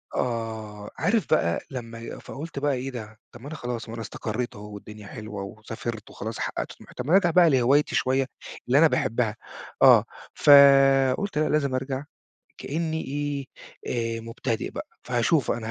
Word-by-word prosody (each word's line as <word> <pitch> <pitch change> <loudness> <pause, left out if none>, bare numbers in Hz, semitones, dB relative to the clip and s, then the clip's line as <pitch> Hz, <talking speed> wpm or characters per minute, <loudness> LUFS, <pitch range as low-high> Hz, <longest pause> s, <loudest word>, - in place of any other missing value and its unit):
آه، 110 -3 -3
عارف 200 - +1
بقى 85 - +2
لمّا 115 -2 -7
فقُلت 145 0 -7
بقى 145 -1 +1
إيه 130 +1 -3
ده؟ 110 -3 -8
طب 120 - -13
ما 135 - -9
أنا 155 - -6
خلاص 120 -4 -5
ما - - -6
أنا 115 - -5
استقرّيت 120 +3 -4
أهو 105 0 -10
والدنيا 105 0 -10
حلوة 105 -3 -7
وسافرت 110 +2 -7
وخلاص 110 +2 -6
حقّقت - - -3
طموحي، - - -16
طب 125 - -5
ما 150 - -2
أنا 190 - +8
أرجع 175 -4 +2
بقى 175 0 +6
لهوايتي 135 +2 +3
شوية، 130 +1 +2 0.4
اللي 130 - +4
أنا 165 - +7
باحبها. 120 -7 0 0.5
آه. - - +8 0.3
فقُلت 140 +3 +6
لأ 155 - +2
لازم 140 -3 +1
أرجع 130 +1 -3 0.5
كإنّي 160 +1 -2
إيه، 145 0 -3 0.7
آآ - - -5
مبتدئ 115 0 -3
بقى. - - -6 0.2
فهاشوف 125 +3 +1
أنا 115 -1 -3
130 Hz, 170 wpm, -25 LUFS, 115-145 Hz, 0.7 s, أنا